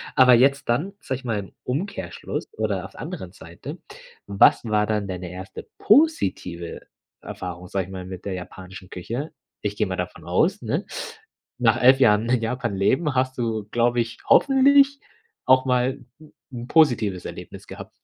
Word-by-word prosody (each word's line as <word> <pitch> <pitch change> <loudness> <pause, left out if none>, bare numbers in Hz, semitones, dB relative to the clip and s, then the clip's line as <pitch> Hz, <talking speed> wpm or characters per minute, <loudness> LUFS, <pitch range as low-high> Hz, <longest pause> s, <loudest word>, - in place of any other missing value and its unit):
Aber 130 -2 +7
jetzt 140 +3 +3
dann, 155 +12 0
sage 130 - -4
ich 130 - -16
mal, 110 -4 -1
im 95 - -9
Umkehrschluss 175 +11 -4
oder - - -2
auf - - -12
anderen - - -7
Seite. - - -10 0.5
Was 100 +4 +4
war 105 -1 +1
dann 105 -2 -1
deine 90 -2 -6
erste 95 +1 -9
positive 95 - +1 0.4
Erfahrung, 90 0 -7
sage 95 -1 -2
ich 95 - -13
mal, 95 -1 -7
mit 95 -1 -9
der 100 - -3
japanischen 95 +1 -9
Küche? 120 - -5 0.3
Ich - - -3
gehe - - 0
mal - - -3
davon - - -5
aus, - - +1
ne, - - -2 0.7
nach 120 -1 +2
11 130 +2 +6
Jahren 110 -2 +4
in 125 -2 +2
Japan 120 -2 -2
leben 135 - +1
hast 130 0 0
du, 110 -3 -1
glaube 120 0 +2
ich, 115 0 -6
hoffentlich, 280 +1 +5 0.5
auch 130 0 +5
mal 125 +1 0 0.2
'n 155 - -17 0.2
'n 120 -1 -7
positives 120 - +2
Erlebnis - - -9
gehabt? - - -9
120 Hz, 165 wpm, -23 LUFS, 95-135 Hz, 0.7 s, Aber